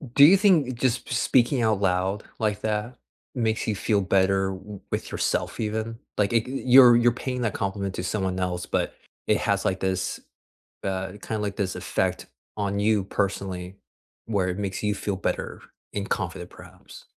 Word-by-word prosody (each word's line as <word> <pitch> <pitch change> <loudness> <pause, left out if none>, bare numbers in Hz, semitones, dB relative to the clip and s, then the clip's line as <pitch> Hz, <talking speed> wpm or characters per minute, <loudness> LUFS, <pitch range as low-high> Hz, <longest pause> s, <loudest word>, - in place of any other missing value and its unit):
Do 140 - +9
you 180 +6 +8
think 155 - +3
just 130 -1 +1
p - - -5
speaking 125 +1 +3
out 110 -3 +2
loud 95 +1 0 0.2
like 105 -2 0
that 110 +3 -2 0.4
makes 110 -2 0
you 110 - 0
feel 100 +1 +1
better 95 0 +2
w 95 +1 -8
with - - -3
yourself - - -1
even? 110 +1 -3 0.2
Like, 105 +2 +1
eh, 115 - +4
you're 130 -2 +7
you're 120 0 +4
paying 125 +1 -4
that 115 -4 0
compliment 100 -1 -2
to - - -3
someone 95 -1 -1
else, 90 -1 -2
but - - -1 0.3
it - - +4
has - - 0
like 95 0 0
this, 95 -1 -1 0.6
uh, 95 -1 -2
kinda 110 - -3
like 100 -1 -3
this 95 -3 -2
effect - - -1 0.3
on 100 -1 -1
you 105 -1 +2
personally 95 -2 -3 0.5
where 100 -5 0
it 90 - -3
makes 95 -1 -3
you 105 0 +1
feel 100 - -2
better - - -3 0.3
and 100 -1 -3
confident - - -3
perhaps. - - -14
105 Hz, 175 wpm, -25 LUFS, 95-115 Hz, 0.6 s, Do